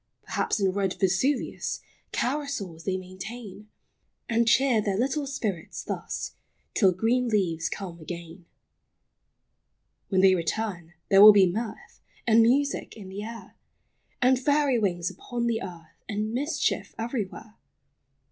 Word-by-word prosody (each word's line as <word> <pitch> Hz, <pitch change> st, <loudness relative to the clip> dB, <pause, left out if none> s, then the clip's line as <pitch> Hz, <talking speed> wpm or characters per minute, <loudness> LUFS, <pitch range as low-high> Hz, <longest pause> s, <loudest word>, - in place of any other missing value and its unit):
Perhaps, -, -, -1 dB
in 195 Hz, -2 st, +2 dB
red 195 Hz, -1 st, -1 dB
Vesuvius 195 Hz, +9 st, 0 dB, 0.3 s
Carousals 245 Hz, -, -2 dB
they 190 Hz, -1 st, 0 dB
maintain; 200 Hz, +3 st, -9 dB, 0.6 s
And 235 Hz, 0 st, +2 dB
cheer 245 Hz, -2 st, +4 dB
their 200 Hz, -2 st, -1 dB
little 275 Hz, +5 st, 0 dB
spirits 210 Hz, -11 st, -4 dB
thus, -, -, -4 dB, 0.4 s
Till 195 Hz, -4 st, +4 dB
green 230 Hz, +7 st, +1 dB
leaves 180 Hz, -7 st, 0 dB
come 180 Hz, -4 st, -6 dB
again. 170 Hz, +2 st, -8 dB, 1.6 s
When 190 Hz, -2 st, +3 dB
they 190 Hz, 0 st, +7 dB
return, 175 Hz, -1 st, -2 dB
there 195 Hz, 0 st, +7 dB
will 210 Hz, 0 st, +12 dB
be 200 Hz, -2 st, +6 dB
mirth 215 Hz, +5 st, -5 dB, 0.2 s
And 230 Hz, -1 st, +6 dB
music 265 Hz, +2 st, +1 dB
in 195 Hz, -3 st, -9 dB
the 195 Hz, +2 st, -6 dB
air, 230 Hz, +2 st, -8 dB, 0.7 s
And 255 Hz, 0 st, +5 dB
fairy 285 Hz, -2 st, +2 dB
wings 175 Hz, -4 st, 0 dB
upon 240 Hz, -1 st, -4 dB
the 230 Hz, -1 st, 0 dB
earth, 170 Hz, -4 st, -10 dB
And 215 Hz, +1 st, -2 dB
mischief 290 Hz, +5 st, -1 dB
everywhere. 225 Hz, -2 st, -5 dB
210 Hz, 130 wpm, -27 LUFS, 185-240 Hz, 1.6 s, will